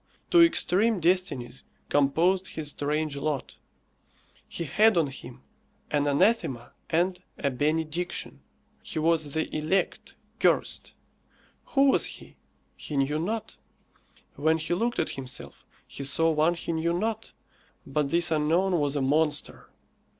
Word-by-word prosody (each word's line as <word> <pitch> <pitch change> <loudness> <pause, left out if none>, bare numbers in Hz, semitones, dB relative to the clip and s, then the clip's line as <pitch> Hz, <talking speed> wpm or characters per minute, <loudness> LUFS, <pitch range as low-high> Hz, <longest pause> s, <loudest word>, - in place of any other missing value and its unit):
Two 345 - +7
extreme 225 - +3
destinies 170 -8 0 0.2
composed 170 +7 +2
his 150 -2 -4
strange 150 +1 -2
lot. 140 -1 -3 0.9
He 170 - -4
had 210 +6 +3
on 165 - +4
him 130 -2 -9 0.5
an 145 -1 +1
anathema 145 - +1 0.2
and 180 +2 +1 0.2
a 140 - -1
benediction. 155 +5 -2 0.4
He - - -6
was 155 -2 +1
the 160 - -2
elect, 155 +5 -1 0.2
cursed. - - +1 0.7
Who 275 -1 +4
was - - +2
he? - - -10 0.4
He 150 - -5
knew 140 +3 +1
not. 215 +7 -3 0.8
When 160 +3 +2
he 160 +2 -2
looked 235 +7 0
at - - 0
himself, 130 -2 -8 0.2
he 140 - -7
saw 165 +4 +1
one 160 +2 +2
he 170 - -4
knew 165 +1 0
not; 220 +3 -3 0.5
but 150 -2 -1
this 170 +1 +2
unknown 165 +4 +2
was 145 -1 0
a 140 - 0
monster. 150 +2 0
160 Hz, 130 wpm, -27 LUFS, 145-180 Hz, 0.9 s, Two